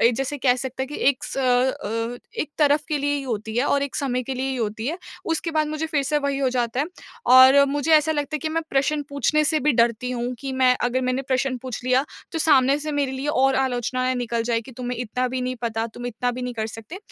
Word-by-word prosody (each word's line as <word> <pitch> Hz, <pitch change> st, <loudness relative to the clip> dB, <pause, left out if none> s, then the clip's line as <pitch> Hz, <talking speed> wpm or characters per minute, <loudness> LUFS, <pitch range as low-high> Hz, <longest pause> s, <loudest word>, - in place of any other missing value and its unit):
अ, -, -, +3 dB
जैसे 270 Hz, +4 st, -2 dB
कह 255 Hz, -2 st, +3 dB
सकते 265 Hz, +1 st, -4 dB
हैं 265 Hz, -, -4 dB
कि 295 Hz, -, -6 dB
एक 275 Hz, -2 st, 0 dB
स -, -, -6 dB
अ, 245 Hz, -3 st, 0 dB, 0.2 s
एक 300 Hz, -, -3 dB
तरफ़ 295 Hz, -1 st, +4 dB
के 305 Hz, -, 0 dB
लिए 285 Hz, +1 st, 0 dB
ही 285 Hz, -, -2 dB
होती 220 Hz, -4 st, -4 dB
है। 250 Hz, -, +2 dB
और 280 Hz, -1 st, +2 dB
एक 280 Hz, -, -4 dB
समय 255 Hz, -3 st, -1 dB
के 265 Hz, +2 st, -4 dB
लिए 260 Hz, +1 st, -2 dB
ही 265 Hz, -, -2 dB
होती 220 Hz, 0 st, -3 dB
है। 320 Hz, +5 st, -1 dB, 0.4 s
उसके 330 Hz, +1 st, -2 dB
बाद 310 Hz, -1 st, +1 dB
मुझे 310 Hz, +1 st, -2 dB
फ़िर 300 Hz, -3 st, 0 dB
से 295 Hz, +2 st, +1 dB
वही 280 Hz, -1 st, -1 dB
हो 270 Hz, -1 st, +2 dB
जाता 245 Hz, 0 st, -1 dB
है। 290 Hz, -, 0 dB, 0.5 s
और 260 Hz, +2 st, +8 dB
मुझे 290 Hz, +2 st, 0 dB
ऐसा 310 Hz, 0 st, +5 dB
लगता 290 Hz, 0 st, -3 dB
है -, -, 0 dB
कि 315 Hz, -, -3 dB
मैं 330 Hz, +1 st, -1 dB
प्रश्न 290 Hz, +2 st, +1 dB
पूछने 285 Hz, +2 st, +1 dB
से 310 Hz, +1 st, +2 dB
भी 300 Hz, +2 st, +2 dB
डरती 235 Hz, +1 st, +1 dB
हूँ 245 Hz, 0 st, -2 dB
कि 270 Hz, +1 st, -5 dB
मैं 260 Hz, -1 st, +4 dB
अगर 245 Hz, +1 st, +1 dB
मैंने 255 Hz, +1 st, 0 dB
प्रश्न 260 Hz, -1 st, 0 dB
पूछ 255 Hz, -3 st, -5 dB
लिया 255 Hz, +2 st, +3 dB, 0.3 s
तो 330 Hz, -, -2 dB
सामने 280 Hz, -4 st, +4 dB
से 305 Hz, +1 st, -4 dB
मेरे 280 Hz, -2 st, 0 dB
लिए 265 Hz, +2 st, -4 dB
और 270 Hz, -2 st, +3 dB
आलोचनाएँ 255 Hz, 0 st, 0 dB
निकल 235 Hz, -2 st, -1 dB
जाएँगी। 230 Hz, +2 st, -2 dB
तुम्हें 250 Hz, -1 st, -4 dB
इतना 250 Hz, +1 st, -2 dB
भी 255 Hz, +1 st, -3 dB
नहीं 255 Hz, 0 st, -2 dB
पता, 225 Hz, -1 st, -1 dB
तुम 245 Hz, +2 st, -8 dB
इतना 245 Hz, +1 st, -2 dB
भी 250 Hz, +1 st, -6 dB
नहीं 250 Hz, 0 st, -4 dB
कर 220 Hz, -1 st, -2 dB
सकते। 225 Hz, -, -9 dB
260 Hz, 255 wpm, -23 LUFS, 245-285 Hz, 0.5 s, और